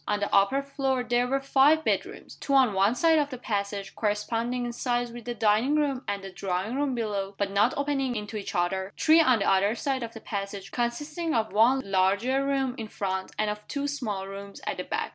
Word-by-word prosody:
On 210 0 0
the 205 - -3
upper 200 +8 +3
floor 270 -2 -1
there 245 0 +1
were 270 +2 +1
five 280 +3 +4
bedrooms - - -2
two 275 - -1
on 255 -6 +5
one 195 +4 +3
side 320 +4 +4
of 290 -1 0
the 255 - -6
passage, 200 -4 -3
corresponding 230 +4 -1
in 240 - -4
size 240 0 -1
with 240 -1 -10
the 240 -1 -4
dining 225 +6 +2
room 280 -4 0
and 200 -1 -3
the 195 - -7
drawing 190 +4 -3
room 280 -2 0
below, 200 -4 -3
but 200 -1 -1
not 205 +5 +2
opening 275 -3 -1
into 210 0 -5
each 210 - -5
other; 190 +2 -1
three 320 +1 +6
on 255 -6 +4
the 200 - -1
other 195 +3 +3
side 265 +1 -2
of 230 -1 -5
the - - -7
passage, 200 -2 -5
consisting 295 +7 -2
of 220 -3 0
one 240 +6 +4
larger 200 +8 +2
room 270 -2 0
in 220 - -5
front, 190 -2 -3
and 215 -1 +1
of 210 0 -8
two 285 0 -2
small 215 -9 -3
rooms 200 0 -9
at - - -2
the - - -3
back. - - -3
230 Hz, 220 wpm, -27 LUFS, 200-270 Hz, -, three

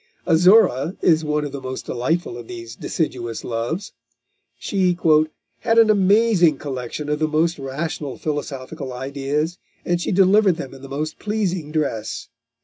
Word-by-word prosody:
Azora 180 - +4
is 160 -2 +4
one 150 -1 0
of 145 - -5
the 140 -1 -6
most 130 0 -5
delightful 130 +3 -1
of 120 -1 -9
these 115 -1 -8
deciduous 120 -8 -3
loves. 120 - -3 0.6
She 185 -3 0 0.6
"had 225 - +1
an 225 -1 +7
amazing 200 -5 +4
collection 135 +1 -5
of 150 0 -1
the 155 - +2
most 160 +1 +1
rational 140 +1 -4
philosophical 145 -2 -4
ideas, 140 +5 -2 0.3
and 175 0 0
she - - -1
delivered 195 0 +5
them 135 -5 -7
in 135 - -12
the 135 - -10
most 155 +3 -4
pleasing 190 -7 -2
dress." 140 -9 -2
155 Hz, 145 wpm, -21 LUFS, 135-180 Hz, 0.6 s, an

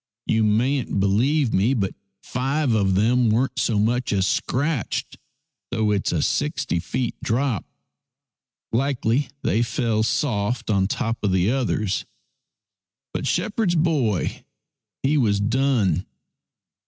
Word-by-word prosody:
You 110 0 +2
mayn't 115 +2 +1
believe 120 +8 +2
me, 110 +8 +2
but 100 -5 -1 0.3
five 135 +1 0
of 100 -3 +2
them 115 +4 +3
weren't 120 +5 +1
so 115 - +1
much 120 +4 +1
as 95 -2 +2
scratched, 140 - -1 0.5
though 110 -1 0
it's 100 -2 0
a - - 0
sixty 85 - 0
feet 120 +9 -2
drop. 120 -2 0 1.1
Likely 125 +1 0
they 110 - +2
fell 115 -2 0
soft 115 -1 0
on 95 -2 +2
top 115 +2 -2
of 100 - +2
the 95 +3 +2
others. 110 -7 -1 1.1
But 140 - -2
shepherd's 185 +2 0
boy 145 - 0 0.6
he 145 +2 +3
was 105 -5 +2
done. 110 - +1
115 Hz, 120 wpm, -23 LUFS, 105-135 Hz, 1.1 s, them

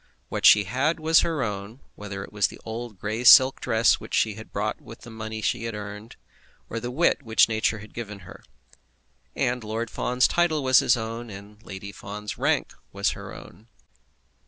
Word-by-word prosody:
What - - +3
she 105 - +7
had 130 - -1
was 160 +1 +4
her 160 -5 0
own, 105 +2 -5
whether 100 -1 -7
it - - -12
was 105 0 +2
the - - -12
old 115 -1 -6
grey 110 +5 -4
silk 130 +2 +8
dress 110 +1 +3
which - - -5
she 110 - +2
had 110 +2 -11
bought 105 +2 -3
with 115 - -13
the 120 - -11
money 110 0 -6
she 115 -1 -1
had 115 -2 -4
earned, 105 +2 -8 0.6
or 115 - -3
the 120 +1 -5
wit 150 +4 +1
which 115 -4 +4
nature 110 0 0
had 105 +1 -13
given 105 -4 -7
her. 90 0 -13 0.9
And 125 -1 -1
Lord 110 +1 -4
Fawn's 125 +1 +1
title 160 -4 +1
was 130 -1 +6
his 120 - +3
own, 115 +1 -5
and 100 +1 -12
Lady 100 -1 -8
Fawn's 105 +1 -7
rank - - 0 0.4
her - - -9
own. 110 - -14
110 Hz, 185 wpm, -25 LUFS, 105-120 Hz, 0.9 s, silk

